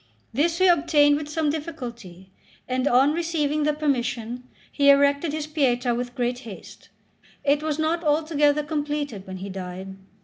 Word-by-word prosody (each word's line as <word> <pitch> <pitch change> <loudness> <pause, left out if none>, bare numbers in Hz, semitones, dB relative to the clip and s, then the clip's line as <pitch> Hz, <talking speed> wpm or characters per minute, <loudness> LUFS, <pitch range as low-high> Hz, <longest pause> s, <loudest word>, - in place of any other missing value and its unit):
This 325 +7 +1
he 375 - +3
obtained 300 -4 +4
with 295 0 -4
some 305 -1 0
difficulty; 235 - -7 0.4
and 255 +2 0
on 270 +3 +4
receiving 310 -3 -1
the 300 - +2
permission, 250 -5 -2 0.3
he 280 -1 +3
erected 280 +2 +4
his 305 0 -3
Pietà 255 -6 +1
with 245 0 -4
great 245 0 -1
haste. 225 -7 -12 0.5
It 285 +1 +2
was 305 -1 -2
not 320 +2 0
altogether 300 -1 +2
completed 290 -8 -3
when 190 0 -6
he 195 +2 -7
died. 190 0 -7
290 Hz, 150 wpm, -24 LUFS, 245-305 Hz, 0.5 s, obtained